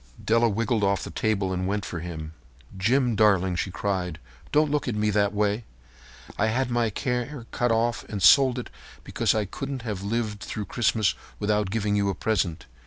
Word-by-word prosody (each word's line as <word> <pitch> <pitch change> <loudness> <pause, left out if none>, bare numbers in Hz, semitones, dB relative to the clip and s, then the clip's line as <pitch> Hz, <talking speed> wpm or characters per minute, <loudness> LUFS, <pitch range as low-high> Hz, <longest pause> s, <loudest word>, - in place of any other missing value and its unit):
Della 115 +1 +4
wriggled 110 +1 0
off 100 0 +1
the - - -6
table 100 -3 0
and 90 0 -2
went 100 +1 -1
for 85 - -5
him. 80 -2 -6 0.4
"Jim, 120 +5 +2
darling," 95 -4 +3
she 90 - -2
cried, 90 -3 -2 0.3
"don't 150 0 +3
look 150 -2 0
at 120 - -1
me 105 0 +1
that 100 0 +2
way. 105 +2 0 0.8
I 110 - +3
had 125 +3 0
my 120 -2 +1
hair 125 +1 -2
cut 120 -1 +1
off 115 +1 +1
and 105 - -5
sold 125 +6 +5 0.3
because - - 0
I 110 -1 +1
couldn't 135 +5 -5
have 105 -5 -4
lived 105 0 -2
through 105 0 -5
Christmas 110 -3 +1 0.2
without 105 -1 0
giving 105 0 0
you 100 -1 +1
a 95 - -1
present. 90 -5 -1
105 Hz, 180 wpm, -26 LUFS, 100-120 Hz, 0.8 s, sold